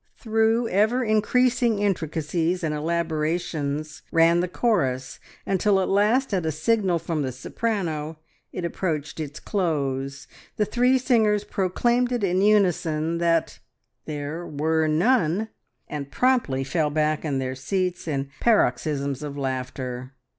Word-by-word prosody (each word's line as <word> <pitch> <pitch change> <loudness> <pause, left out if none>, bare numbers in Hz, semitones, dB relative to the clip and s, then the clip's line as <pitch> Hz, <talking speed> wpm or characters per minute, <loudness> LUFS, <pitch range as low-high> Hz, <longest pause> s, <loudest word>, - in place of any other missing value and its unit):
Through 225 +1 +1
ever 220 +6 +2
increasing 235 +1 +2
intricacies 170 -2 -1
and 155 -2 0
elaborations 155 -1 -2
ran 165 +1 +4
the 180 - 0
chorus, 135 - 0 0.3
until 195 +1 +2
at 190 - 0
last 215 +6 +2
at 185 -3 +1
a 160 - 0
signal 185 +3 +1
from 165 -1 -2
the 130 -2 -2
soprano 160 - -3 0.3
it 180 - -4
approached 160 -4 -3
its 150 -2 -5
close, 140 -7 -2 0.3
the 210 - +2
three 245 +5 +3
singers 220 -5 +2
proclaimed 240 +7 0
in 195 -6 +1
unison 170 -6 +2
that 165 -1 +1 0.5
"there 150 +2 -4
were 160 0 0
none!" 190 +3 +2 0.4
and 145 -2 -5
promptly 240 - +1
fell 150 +2 0
back 155 0 0
in 145 -4 -1
their 130 -1 -2
seats 180 +7 -2
in 140 -2 -2
paroxysms 140 - +1
of 145 -1 -6
laughter. 130 -1 -4
165 Hz, 125 wpm, -24 LUFS, 150-210 Hz, 0.5 s, ran